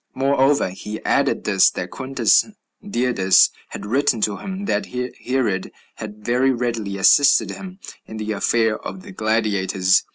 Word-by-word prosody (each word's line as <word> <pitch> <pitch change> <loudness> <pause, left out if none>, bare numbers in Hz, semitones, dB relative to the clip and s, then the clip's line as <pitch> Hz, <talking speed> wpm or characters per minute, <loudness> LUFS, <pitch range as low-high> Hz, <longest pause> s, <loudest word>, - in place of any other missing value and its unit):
Moreover, 135 -3 +2
he 105 +3 -7
added - - +1
this, - - +4
that - - -6
Quintus 130 -4 +2 0.4
Didius 120 - +3 0.2
had - - -8
written 130 +2 +1
to 105 -1 0
him 195 +1 -6
that - - -1
Herod 125 -5 -3 0.3
had 105 -1 -9
very 125 +2 +2
readily 115 -5 -2
assisted 140 +8 +4
him 185 -1 -9 0.3
in 110 - -8
the 110 0 -4
affair 110 +1 0
of 185 - -8
the 205 - -11
gladiators. 100 - +1
120 Hz, 140 wpm, -21 LUFS, 105-135 Hz, 0.4 s, this